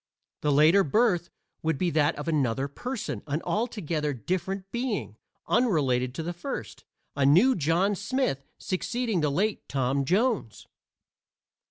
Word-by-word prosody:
The 150 Hz, -, +1 dB
later 155 Hz, +7 st, +6 dB
birth 180 Hz, -, +2 dB, 0.3 s
would 160 Hz, -2 st, 0 dB
be 175 Hz, +2 st, 0 dB
that 155 Hz, 0 st, +2 dB
of -, -, -6 dB
another 135 Hz, -4 st, +1 dB
person, 245 Hz, -, -5 dB
an 145 Hz, +1 st, -1 dB
altogether 170 Hz, -10 st, -1 dB
different 185 Hz, -, -3 dB
being, 235 Hz, -, -2 dB, 0.3 s
unrelated 135 Hz, -, +1 dB
to 165 Hz, -, -3 dB
the 175 Hz, +2 st, -3 dB
first 265 Hz, +11 st, -6 dB, 0.3 s
a 140 Hz, -, +1 dB
new 180 Hz, -, +6 dB
John 175 Hz, +5 st, +2 dB
Smith 205 Hz, -, -1 dB
succeeding 220 Hz, 0 st, -1 dB
to 150 Hz, -, +2 dB
the -, -, 0 dB
late 205 Hz, +8 st, -1 dB
Tom 135 Hz, 0 st, 0 dB
Jones. 195 Hz, -, 0 dB
170 Hz, 140 wpm, -27 LUFS, 140-210 Hz, 0.3 s, later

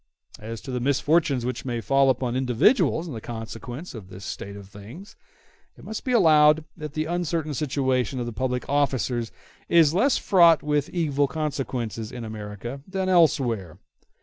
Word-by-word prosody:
As 110 Hz, +1 st, -7 dB
to 135 Hz, -, -7 dB
the 125 Hz, -, -2 dB
misfortunes 140 Hz, 0 st, +1 dB
which 125 Hz, -, -3 dB
may 120 Hz, -3 st, -3 dB
fall 135 Hz, +3 st, +3 dB
upon 125 Hz, -1 st, 0 dB
individuals 130 Hz, -, +2 dB
in 125 Hz, -8 st, -6 dB
consequence 120 Hz, +7 st, -7 dB
of 105 Hz, -6 st, -10 dB
this 95 Hz, +1 st, -10 dB
state 100 Hz, 0 st, -6 dB
of 100 Hz, -1 st, -11 dB
things, 110 Hz, -, -12 dB, 0.6 s
it -, -, -15 dB
must 220 Hz, -, -6 dB
be 255 Hz, -, -2 dB
allowed 155 Hz, -7 st, +5 dB
that 150 Hz, -3 st, -7 dB
the 155 Hz, 0 st, -1 dB
uncertain 165 Hz, -2 st, -2 dB
situation 130 Hz, -3 st, -1 dB
of 120 Hz, -, -2 dB
the 120 Hz, -, -5 dB
public 125 Hz, +2 st, -2 dB
officers 130 Hz, -5 st, 0 dB, 0.4 s
is 165 Hz, -3 st, +5 dB
less 245 Hz, +9 st, +3 dB
fraught 170 Hz, -4 st, +5 dB
with 150 Hz, -1 st, 0 dB
evil 145 Hz, -5 st, 0 dB
consequences 130 Hz, -7 st, -4 dB
in 125 Hz, -2 st, -7 dB
America 110 Hz, +4 st, -7 dB
than 190 Hz, 0 st, -2 dB
elsewhere. 130 Hz, -, +2 dB
135 Hz, 160 wpm, -25 LUFS, 120-155 Hz, 0.6 s, allowed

